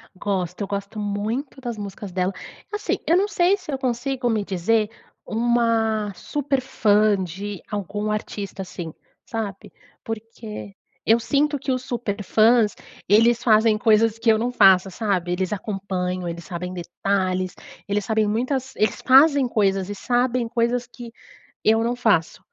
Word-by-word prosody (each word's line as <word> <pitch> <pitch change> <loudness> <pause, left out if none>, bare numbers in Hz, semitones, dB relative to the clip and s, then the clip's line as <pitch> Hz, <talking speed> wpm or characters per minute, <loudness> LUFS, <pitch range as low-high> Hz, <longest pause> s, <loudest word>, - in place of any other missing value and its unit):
Gosto, 185 -1 -3
eu 200 - -2
gosto 200 +2 -4
muito 215 +7 -3
das 240 -3 -4
músicas 200 -1 -7
dela 185 +1 -1 0.4
assim, 420 - -1
eu 340 - +5
não 400 +2 +2
sei 375 0 +2
se 360 -6 -8
eu 270 - -1
consigo 255 0 -1
me 220 -3 +1
dizer 205 +3 +1 0.4
uma 225 -2 +1
super 280 +2 -2
fã 210 -4 +3
de 190 +3 -5
algum 210 +1 -3
artista 205 -2 -4
assim, 175 -3 -7 0.3
sabe? 215 -4 -5 0.3
Porque, 225 -2 -7 0.3
eu 225 +2 +5
sinto 290 +5 +1
que 270 0 -2
os 255 -1 -1
super 230 -5 -3
fãs, 220 +2 +4 0.3
eles 230 +3 +4
fazem 220 -1 +4
coisas 220 0 +3
que 225 - +2
eu 220 - +3
não 240 +3 -1
faço, 195 -5 +5
sabe? 185 -4 -1
Eles 185 +2 -1
acompanham, 185 -3 -3
eles 170 0 -5
sabem 180 +1 -5
detalhes, 185 +1 -1 0.3
eles 205 -1 -1
sabem 220 0 +1
muitas 255 +5 -1
eles 215 -2 0
fazem 275 0 +6
coisas 195 -4 +1
e 205 - -4
sabem 245 +2 0
coisas 240 +1 0
que 240 -1 -10 0.5
eu 225 +1 +4
não 240 +1 0
faço. 210 -9 +1
215 Hz, 150 wpm, -23 LUFS, 195-240 Hz, 0.5 s, fazem